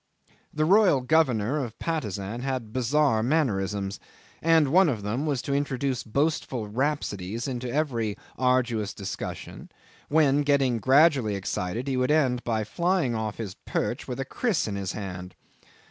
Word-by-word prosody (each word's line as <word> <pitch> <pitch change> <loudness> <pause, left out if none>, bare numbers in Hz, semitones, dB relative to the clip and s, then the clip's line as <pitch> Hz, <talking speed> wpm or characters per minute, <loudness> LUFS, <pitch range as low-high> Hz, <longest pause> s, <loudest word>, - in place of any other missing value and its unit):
The 155 0 0
royal 190 -6 +5
governor 135 -2 +2
of 115 -3 -7
Patusan 110 - -3
had 130 -5 -3
bizarre 130 -1 +2
mannerisms, 105 -8 0 0.4
and 160 -3 +4
one 180 +3 +5
of 110 -7 -3
them 120 +9 -2
was 140 -4 -1
to 140 - -2
introduce 140 -2 -1
boastful 130 -2 -1
rhapsodies 115 -4 -2
into 125 -2 -4
every 120 -8 -1 0.2
arduous 125 -5 +1
discussion, 100 -2 -6 0.4
when, 145 -2 +4
getting 140 -4 +2
gradually 135 -5 +4
excited, 100 +5 -3
he 135 -2 0
would 125 +1 +1
end 130 -5 +2
by 110 -2 0
flying 170 - 0
off 110 -2 -3
his 105 -5 -5
perch - - -3
with 125 - -5
a 135 - -2
kriss 220 - -1
in 105 - -3
his 95 -2 -3
hand. 90 -3 -7
125 Hz, 145 wpm, -26 LUFS, 110-145 Hz, 0.4 s, royal